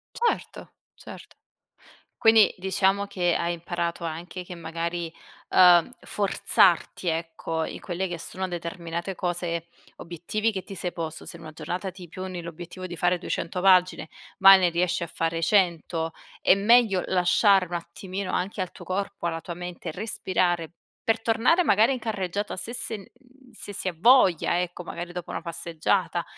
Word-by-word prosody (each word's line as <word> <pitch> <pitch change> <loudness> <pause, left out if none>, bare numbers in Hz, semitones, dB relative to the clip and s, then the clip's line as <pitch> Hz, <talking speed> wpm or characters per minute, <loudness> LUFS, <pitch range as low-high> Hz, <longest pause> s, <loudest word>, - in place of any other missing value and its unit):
Certo, 475 - -2 0.2
certo. - - -12 0.8
Quindi 225 -1 +6
diciamo 190 +2 +1
che 175 -3 0
hai 170 0 -1
imparato 170 0 -3
anche 170 +3 -5
che 180 - -8
magari, 170 +1 -4 0.4
uhm, 175 +1 +6
forzarti, 190 -3 +2
ecco, 165 0 -2
in - - -7
quelle 185 +1 -3
che 175 - -5
sono 185 +3 -4
determinate 170 +1 -5
cose 175 -2 -2 0.3
obiettivi 175 +6 -2
che 190 -2 -4
ti 195 - -9
sei 180 -1 -4
posto. 160 -2 -4
Se - - -6
in - - -14
una 155 - -9
giornata 175 +5 -4
ti 180 -2 -11
poni 185 0 -6
l'obiettivo 175 +2 -8
di 175 - -6
fare 175 +2 +2
200 180 0 -3
pagine, 185 -4 +4 0.3
ma 195 -1 +10
ne 185 -2 +3
riesci 175 +1 0
a - - -7
fare 165 0 -2
100, 165 -3 +1 0.3
è - - +6
meglio 210 -2 +4
lasciare 190 +2 +4
un 175 - -15
attimino 185 +3 -5
anche 195 +3 -2
al 185 -2 -2
tuo 175 - -12
corpo, 195 +1 -3
alla 165 -1 -3
tua 170 +1 -7
mente, 175 -1 -6
respirare 180 -4 -1 0.3
per 225 0 0
tornare 245 +11 +3
magari 225 - +4
in 255 - -6
carreggiata 205 -3 -3
se 225 +6 -3
sen 225 -2 -1
mhmm, 255 +4 -21
se 205 -2 -8
si 190 - -4
ha 180 - -4
voglia 185 - +4
ecco, 180 0 -4
magari 175 0 -6
dopo 180 -1 -6
una - - -3
passeggiata. 170 +1 -1
180 Hz, 160 wpm, -26 LUFS, 170-195 Hz, 0.8 s, ma